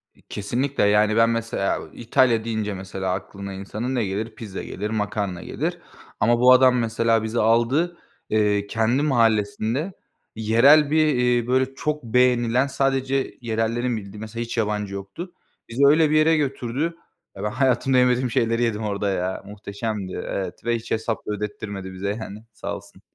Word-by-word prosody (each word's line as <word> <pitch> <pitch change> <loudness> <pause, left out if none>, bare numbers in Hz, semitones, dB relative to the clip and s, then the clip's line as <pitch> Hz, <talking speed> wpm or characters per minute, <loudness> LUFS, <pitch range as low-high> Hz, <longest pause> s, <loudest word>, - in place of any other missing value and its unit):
İ - - -24
kesinlikle. 125 +7 -1
Yani 105 +1 +3
ben 115 0 +5
mesela, 115 -4 -1
eee, - - -12
İtalya 120 -1 +3
deyince 110 -2 -2
mesela 95 -1 -4
aklına 100 +1 -6
insanın 105 +7 -4
ne 120 -4 +1
gelir? 110 +4 -4
Pizza 105 -4 -7
gelir, 105 +3 -5
makarna 105 -4 -2
gelir. - - -3 0.4
Ama 120 +3 +3
bu 125 +1 +7
adam 130 0 +5
mesela 115 -1 +1
bizi 110 +2 -2
aldı, 120 +10 +2 0.3
eee, 105 -1 +1
kendi 115 +5 +1
mahallesinde 115 - +1 0.4
yerel 130 +7 +5
bir, 155 0 +4
iii, 125 -1 +2
böyle 130 +1 +1
çok 150 0 -2
beğenilen 125 +1 +2
sadece 135 0 -1
yerellerin 115 +1 -1
bildiği 100 0 -9
mesela 110 +2 -5
hiç 120 0 -6
yabancı 105 -2 -1
yoktu. 100 - -7 0.4
Bizi 125 +5 +2
öyle 155 +2 +5
bir 155 - +2
yere 155 +1 +4
götürdü. 140 +3 -2 0.4
Ben 95 - -7
hayatımda 130 +1 +2
yemediğim 125 0 +3
şeyleri 115 +1 +1
yedim 110 -2 -1
orada 100 -1 -1
ya. 95 -1 -2
Muhteşemdi 100 -1 -5
evet 95 -2 -5
ve 120 0 +1
hiç 115 - -7
hesap 110 0 -1
ödettirmedi 105 -2 -5
bize 95 +2 -3
yani 105 0 -8
sağ - - -5
olsun. - - -13
115 Hz, 160 wpm, -23 LUFS, 105-125 Hz, 0.4 s, bu